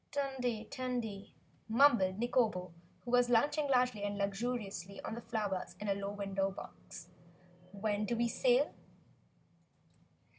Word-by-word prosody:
"Tandy! 255 Hz, -5 st, -1 dB
Tandy!" 240 Hz, -6 st, -4 dB, 0.3 s
mumbled 225 Hz, -6 st, +5 dB
Nikobo, 220 Hz, -6 st, +1 dB, 0.3 s
who 240 Hz, -, -4 dB
was 245 Hz, 0 st, +4 dB
lunching 290 Hz, +5 st, +3 dB
largely 250 Hz, -5 st, +2 dB
and 205 Hz, 0 st, -2 dB
luxuriantly 200 Hz, -2 st, -3 dB
on -, -, -4 dB
the 235 Hz, -, -5 dB
flowers 210 Hz, -5 st, -3 dB
in 210 Hz, -, -4 dB
a 200 Hz, -, +3 dB
low 200 Hz, 0 st, -3 dB
window 195 Hz, -1 st, -1 dB
box. 180 Hz, -2 st, -10 dB, 0.6 s
"When 205 Hz, +1 st, -1 dB
do 235 Hz, -, 0 dB
we 235 Hz, +1 st, +2 dB
sail?" -, -, +3 dB
220 Hz, 125 wpm, -34 LUFS, 200-250 Hz, 0.6 s, mumbled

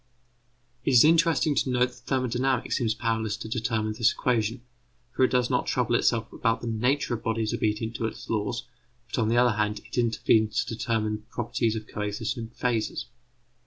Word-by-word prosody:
It 135 Hz, -, +1 dB
is 120 Hz, -, +8 dB
interesting 165 Hz, -1 st, +4 dB
to 135 Hz, -, 0 dB
note 125 Hz, 0 st, +2 dB
that -, -, -19 dB
thermodynamics 130 Hz, 0 st, 0 dB
seems 115 Hz, -3 st, 0 dB
powerless 110 Hz, -1 st, -1 dB
to 110 Hz, -, -7 dB
determine 110 Hz, -2 st, -1 dB
this 115 Hz, +1 st, +3 dB
equation, 120 Hz, -1 st, -1 dB, 0.5 s
for -, -, +3 dB
it 130 Hz, -, +5 dB
does 125 Hz, -1 st, +2 dB
not 125 Hz, -, +1 dB
trouble 125 Hz, -2 st, 0 dB
itself 115 Hz, -1 st, +1 dB
about 115 Hz, -2 st, 0 dB
the -, -, -6 dB
nature 125 Hz, +4 st, 0 dB
of 115 Hz, -, -2 dB
the -, -, -23 dB
bodies 110 Hz, -1 st, 0 dB
obedient 110 Hz, +1 st, -1 dB
to 115 Hz, -, -1 dB
its 110 Hz, -, -8 dB
laws; 110 Hz, +2 st, -2 dB, 0.5 s
but, -, -, -1 dB
on 110 Hz, -, +1 dB
the 115 Hz, +2 st, +2 dB
other 120 Hz, -3 st, +4 dB
hand, 105 Hz, 0 st, 0 dB
it -, -, -3 dB
intervenes 110 Hz, -2 st, +2 dB
to -, -, -5 dB
determine 110 Hz, -1 st, -1 dB
the -, -, -17 dB
properties 115 Hz, -1 st, -1 dB
of 110 Hz, -1 st, -5 dB
coexisting 110 Hz, +3 st, -3 dB
phases. 115 Hz, -1 st, -2 dB
115 Hz, 190 wpm, -27 LUFS, 110-125 Hz, 0.5 s, is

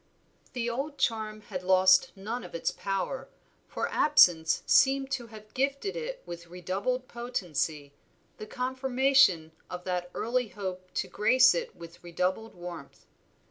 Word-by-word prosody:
The 240 Hz, -2 st, -2 dB
old 275 Hz, +5 st, -3 dB
charm 215 Hz, -3 st, -1 dB
had 190 Hz, -3 st, -6 dB
lost 185 Hz, 0 st, +5 dB
none 220 Hz, +5 st, -5 dB
of -, -, -10 dB
its 165 Hz, -, -1 dB
power, 195 Hz, +7 st, -3 dB, 0.4 s
for -, -, -3 dB
absence 175 Hz, -, +4 dB
seemed 270 Hz, 0 st, +4 dB
to 250 Hz, -3 st, -3 dB
have 215 Hz, -1 st, -14 dB
gifted 275 Hz, +8 st, -1 dB
it -, -, -5 dB
with 170 Hz, 0 st, -8 dB
redoubled 195 Hz, +9 st, -3 dB
potency, 165 Hz, -, -3 dB, 0.4 s
the 215 Hz, -, -8 dB
confirmation 260 Hz, -9 st, +2 dB, 0.2 s
of 180 Hz, 0 st, -6 dB
that 180 Hz, -1 st, -3 dB
early 245 Hz, +1 st, 0 dB
hope 185 Hz, -3 st, -7 dB
to -, -, -1 dB
grace 235 Hz, +6 st, +5 dB
it 170 Hz, -, -4 dB
with 170 Hz, 0 st, -13 dB
redoubled 185 Hz, +5 st, -2 dB
warmth. 175 Hz, -1 st, -10 dB
215 Hz, 140 wpm, -29 LUFS, 180-255 Hz, 0.4 s, lost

